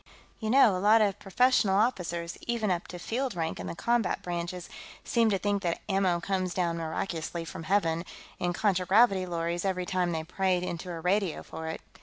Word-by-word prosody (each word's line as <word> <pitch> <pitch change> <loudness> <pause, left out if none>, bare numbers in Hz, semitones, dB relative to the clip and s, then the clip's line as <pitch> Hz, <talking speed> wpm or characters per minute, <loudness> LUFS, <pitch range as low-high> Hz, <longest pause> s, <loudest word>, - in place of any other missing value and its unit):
"You 220 - -3
know, 235 -5 +6
a - - -1
lot 215 +3 +6
of 205 -1 0
professional 205 -1 +3
officers, 175 -7 0
even 230 -4 0
up 175 -1 -2
to 180 - -7
field 240 +5 -2
rank 165 -1 -2
in - - -5
the - - -5
combat 235 +1 0
branches, 175 0 -4 0.4
seem 230 -2 +2
to 200 - +2
think 200 +1 0
that 170 -3 -1
ammo 190 -3 +2
comes 185 0 -2
down 170 -2 0
miraculously 165 0 -3
from 165 - -7
Heaven, 165 -3 +1 0.4
in 175 - 0
contragravity 190 +1 +3
lorries, 170 0 -2
every 185 -2 -1
time 180 -1 0
they 160 -1 -2
pray 185 +2 0
into 180 0 -5
a 170 -2 -5
radio 185 0 0
for 160 0 -7
it. 160 - -5
185 Hz, 190 wpm, -29 LUFS, 170-205 Hz, 0.4 s, know